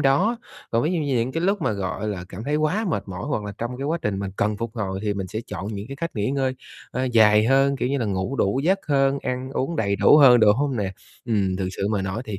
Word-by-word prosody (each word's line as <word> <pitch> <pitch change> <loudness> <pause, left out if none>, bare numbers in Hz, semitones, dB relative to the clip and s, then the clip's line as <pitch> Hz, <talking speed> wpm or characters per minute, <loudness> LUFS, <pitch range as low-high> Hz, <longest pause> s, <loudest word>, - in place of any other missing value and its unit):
đó. 160 - +3 0.3
Còn 115 +1 +1
ví 160 +4 0
dụ 170 - 0
như 140 -4 0
những 120 +3 0
cái 165 - -2
lúc 195 0 +1
mà, - - +1
gọi 100 +1 -3
là, 95 -4 -4
cảm 100 +4 -8
thấy 150 +3 0
quá 160 +9 0
mệt - - -1
mỏi 90 -1 -5
hoặc 110 -8 -2
là 100 - -5
trong 120 +2 -4
cái 135 - -4
quá 165 +3 0
trình 100 -2 -1
mình 100 -1 -3
cần 105 0 0
phục 115 0 -4
hồi 95 -3 -2
thì 105 -1 -1
mình 95 -1 -3
sẽ 110 +4 -4
chọn 95 - -6
những 105 -1 -5
cái 140 - -7
cách 170 +2 -3
nghỉ 105 +3 0
ngơi, 135 -1 0 0.4
a, 130 - -1
dài 110 -3 +5
hơn, 135 +1 +3
kiểu 125 - -1
như, 140 +1 0
là 120 - -1
ngủ 95 +7 -2
đủ 100 +4 +1
giấc 190 +3 +3
hơn, 140 -1 +2
ăn 125 +1 -3
uống 135 +5 -2
đầy 100 -4 0
đủ 145 - +6
hơn, 125 -5 +7
đúng 105 -1 +6
hông 140 -2 0
nè? 95 -2 -2 0.3
Ừm, 100 -5 0
thực 95 -1 -2
sự 100 - -1
mà 105 -2 0
nói 95 +5 -3
thì 105 -3 -5
120 Hz, 285 wpm, -23 LUFS, 100-140 Hz, 0.4 s, hơn